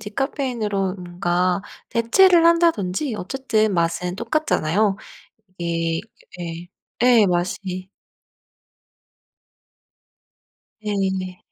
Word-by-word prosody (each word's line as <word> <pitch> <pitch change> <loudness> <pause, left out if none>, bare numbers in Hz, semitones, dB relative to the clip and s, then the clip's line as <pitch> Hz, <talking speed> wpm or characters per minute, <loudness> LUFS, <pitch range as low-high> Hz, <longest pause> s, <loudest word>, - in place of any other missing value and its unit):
디카페인으로 215 -4 -2
뭔가 180 0 -1 0.3
대체를 330 +10 +5
한다든지 305 - +2
어쨌든 220 -1 0
맛은 175 +1 -1
똑같잖아요. 215 - +1 0.6
이게 165 -1 -1 0.4
예. 170 0 -6 0.3
예 240 -3 +6
맛이 185 +1 -2 3.0
예. 190 -3 -2
195 Hz, 165 characters per minute, -22 LUFS, 180-235 Hz, 3.0 s, 예